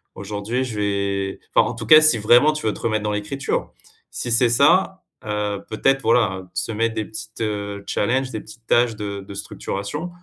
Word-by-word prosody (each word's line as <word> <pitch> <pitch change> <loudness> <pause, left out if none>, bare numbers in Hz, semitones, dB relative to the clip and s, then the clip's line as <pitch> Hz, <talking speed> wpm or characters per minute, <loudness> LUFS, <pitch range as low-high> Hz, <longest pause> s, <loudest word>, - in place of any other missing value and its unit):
«Aujourd'hui, 105 +5 -3
je 125 -4 -5
vais» 100 -1 -1 0.2
enfin, - - +5
en - - -3
tout - - -6
cas, 155 0 +10
si 155 -6 +5
vraiment, 120 +8 +5
tu 150 - -5
veux 105 - +1
te - - -10
remettre 110 -2 -1
dans 105 - -1
l'écriture. 105 +7 -3 0.4
Si 120 - -4
c'est 120 +1 +4
ça, 185 +10 +3 0.2
heu, 105 -1 -2
peut-être, 135 +5 +1
voilà, 110 -5 +2
heu, 95 - -12
se 90 +5 -2
mettre 115 +1 -1
des 110 - -1
petites, 110 +1 -9
heu, 100 -2 -3
challenges, 130 +4 0
des 110 - -4
petites 115 +1 -15
tâches 120 -1 +3
de 100 -1 -5
de 100 +1 -10
structuration 100 - -5
110 Hz, 200 wpm, -22 LUFS, 100-125 Hz, 0.4 s, cas